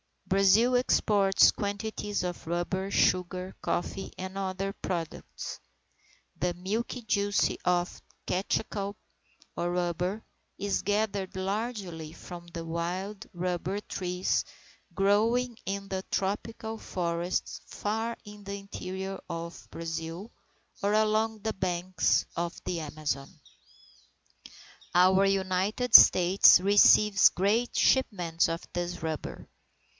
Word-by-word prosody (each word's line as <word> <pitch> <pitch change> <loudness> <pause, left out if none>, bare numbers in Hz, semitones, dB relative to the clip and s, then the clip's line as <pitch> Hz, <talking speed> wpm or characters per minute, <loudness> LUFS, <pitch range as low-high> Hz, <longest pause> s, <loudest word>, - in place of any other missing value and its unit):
Brazil 195 +6 +4
exports 205 -5 +4
quantities 205 0 -3
of 175 -2 -5
rubber, 175 +3 -2
sugar, 185 -1 +1
coffee, 195 +2 -3
and 185 +1 -6
other 195 0 -2
products. 170 -4 -5 0.8
The 180 0 0
milky 215 +8 -3
juice 205 -2 +1 0.2
of 180 0 0 0.2
the - - -2
caoutchouc 200 0 -2 0.6
or 175 0 -1
rubber, 180 +4 -1 0.3
is 200 0 -1
gathered 205 -2 -1
largely 190 -5 -4
from 175 0 -10
the 170 -1 -7
wild 180 +5 -4
rubber 180 +2 -2
trees 180 -2 -1 0.5
growing 225 +5 +2
in 195 0 -4
the 190 -1 -2
tropical 220 +3 -3
forests 175 -2 -2
far 225 +3 -3
in 205 -1 -12
the 200 0 -4
interior 195 -1 -6
of 170 0 -6
Brazil, 165 +5 -6 0.5
or 200 +1 +1
along 215 +1 +2
the 220 +1 -2
banks 180 -2 0
of 170 0 -3
the 175 - -2
Amazon. 150 -3 -4 1.7
Our 185 +2 +5
United 195 +5 0
States 180 0 +8
receives 205 +1 +6
great 215 +6 0
shipments 180 -10 +2
of 165 +1 -3
this 175 -1 -3
rubber. 160 -1 -5
190 Hz, 105 wpm, -29 LUFS, 175-205 Hz, 1.7 s, States